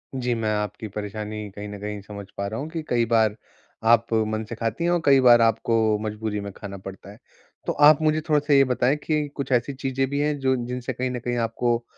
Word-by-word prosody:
जी, 125 -2 -1
मैं 110 -1 -1
आपकी 105 +1 -4
परेशानी 105 +1 -5
कहीं 105 0 -6
न 105 0 -8
कहीं 105 0 -5
समझ 100 0 -9
पा 100 - -2
रहा 110 +3 -4
हूँ 150 - -5
कि 160 0 -4
कई 120 -1 +2
बार 110 -2 +2 0.6
आप 115 0 +2
मन 110 0 -2
से 115 - -5
खाती 115 +7 -2
हैं 170 - +2
और 175 -1 +1
कई 135 -1 +6
बार 120 -2 +7
आपको 115 -1 +2
मजबूरी 105 0 -3
में 100 0 -6
खाना 100 -2 -7
पड़ता 95 +1 -10
है। 105 - -15 0.5
तो - - +1
आप 155 +1 +6
मुझे 155 0 +2
थोड़ा-सा 150 -1 +3
ये 135 -1 +7
बताएँ 125 +1 +1
कि 150 -2 0
कुछ 135 -2 -4
ऐसी 125 +2 +1
चीज़ें 135 0 -1
भी 140 +1 -1
हैं 150 0 0
जो 130 -1 +2
जिनसे 125 +1 -4
कहीं 130 +2 -2
न 125 - -3
कहीं 120 0 -2
आपको 120 +1 0
115 Hz, 230 wpm, -24 LUFS, 105-135 Hz, 0.6 s, बार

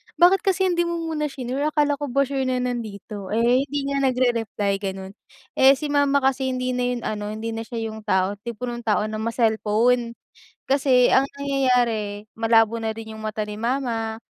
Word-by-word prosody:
"Bakit 360 +2 +5
kasi 380 0 +1
hindi 345 0 +1
mo 340 - -2 0.2
muna 300 -1 -1
shinure, 270 +2 -3
akala 295 -2 +1
ko 290 - -3
ba 275 +2 +2
sure 270 -1 -2
na 255 - 0
nandito? 210 -4 -5
Eh, 235 +4 +3
hindi 285 0 -2
niya 280 0 -1
nag-rereply," 235 -6 0
ganon. 190 -1 -5 0.5
Eh, 265 +1 +7
si 290 +2 -4
mama 285 -1 +2
kasi, 265 0 +1
hindi 255 0 -1
na 250 -1 -1
ano, 210 0 -4
hindi 225 +1 -4
na 225 0 -5
siya 225 -2 -4
'yung 220 - -8 0.5
tipo 235 +1 -6
ng 240 -1 -3
tao 210 0 +2
na 215 - -4
ma-cellphone. 230 +1 +1 0.5
Kasi 265 -2 +4
ang 270 - +4
nangyayari, 245 -7 0
malabo 225 0 +3
na 225 -1 -2
rin 220 0 -9
'yung 220 - -9
mata 215 0 -3
ni 210 0 -6
mama. 230 -2 -2
245 Hz, 180 wpm, -23 LUFS, 220-275 Hz, 0.5 s, Eh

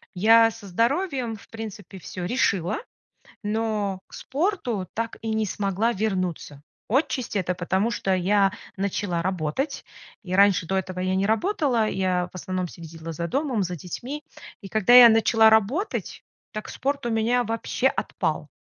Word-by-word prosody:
Я 225 +4 +6
со 220 -2 -12
здоровьем 245 - 0
в 205 - -15
принципе 210 -4 -8
всё 180 0 -6
решила, 195 -5 +1 0.7
но 210 -3 -1
к - - -16
спорту 265 - -2
так 230 0 -3
и 225 - -4
не 220 - +1
смогла 200 +3 0
вернуться. 185 -8 -3 0.3
Отчасти 255 -2 0
это 180 -1 -1
потому, 190 +5 0
что 195 -4 0
я 195 +2 +3 0.3
начала 195 -3 -1
работать. 185 - -2 0.4
И 185 -1 -4
раньше 200 -2 +5
до 190 - -1
этого 185 0 -4
я 185 0 0
не 195 +1 +1
работала, 245 - +1
я 185 -2 0
в - - -10
основном 185 0 -3
следила 165 0 -9
за 170 +2 -4
домом, 260 - 0
за 180 0 -3
детьми. 250 - -6 0.4
И 195 - -8
когда 220 +2 +4
я 245 -2 +11
начала 225 0 +5
работать, 220 - 0 0.3
так 215 - -6
спорт 280 0 -2
у - - 0
меня 230 +2 +2
вообще 230 +3 0
отпал. 160 - -2
210 Hz, 155 wpm, -25 LUFS, 185-235 Hz, 0.7 s, я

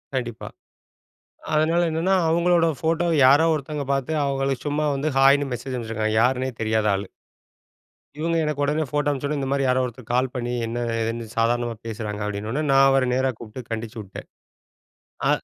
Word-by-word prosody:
கண்டிப்பா. 120 -3 -4 1.1
அதனால 165 +3 +3
என்னன்னா, 175 +4 +1
அவுங்களோட 170 0 +3
ஃபோட்டோவ 165 +1 +1
யாரோ 145 +5 +6
ஒருத்தவங்க 145 -1 -3
பார்த்து 135 +3 -1
அவுங்களுக்கு 135 0 -1
சும்மா 150 +1 0
வந்து 145 +3 -1
ஹாய்ன்னு 135 +1 +5
மெசேஜ் 130 +2 -5
அனுப்பிச்சிருக்காங்க. 110 -2 -2
யாருன்னே 130 +1 +1
தெரியாத 110 -1 +1
ஆளு. 95 0 -4 1.1
இவுங்க 165 +1 0
எனக்கு 150 -1 -1
உடனே 150 +2 +1
ஃபோட்டோ 145 -1 0
அனுப்பிச்சவுடனே, 145 +1 -2
"இந்த 135 -1 -3
மாதிரி 140 -1 +1
யாரோ 130 0 +2
ஒருத்தர் 120 -1 -9
கால் 130 0 +1
பண்ணி 120 0 -2
என்ன 120 +1 -4 0.2
ஏதுன்னு 115 +1 -3
சாதாரணமா 120 0 +1
பேசுறாங்க." 105 -2 -5
அப்பிடின 105 +1 -4
உடனே 150 +4 -1
நான் 135 0 +6
அவர 135 -1 +3
நேரா 130 +1 +1
கூப்பிட்டு 115 +1 -9
கண்டிச்சி 115 0 -5
விட்டேன். 95 -2 -10 1.0
ஆ - - +2
135 Hz, 160 wpm, -23 LUFS, 115-150 Hz, 1.1 s, யாரோ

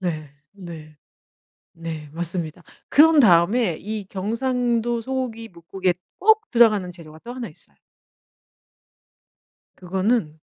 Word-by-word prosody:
네. 155 -5 -4 0.2
네. 165 -6 -11 0.8
네 160 -3 -7
맞습니다. 170 0 -4 0.3
그런 315 +1 +6
다음에 185 - +4
이 215 -1 -5
경상도 235 +3 -1
소고기뭇국에 225 -8 -3 0.3
꼭 440 +2 +3
들어가는 215 -7 +4
재료가 160 -3 -12
또 240 +7 -8
1 250 -2 -5
있어요. - - -12 2.0
그거는 185 -3 -1
195 Hz, 210 characters per minute, -23 LUFS, 170-240 Hz, 2.0 s, 그런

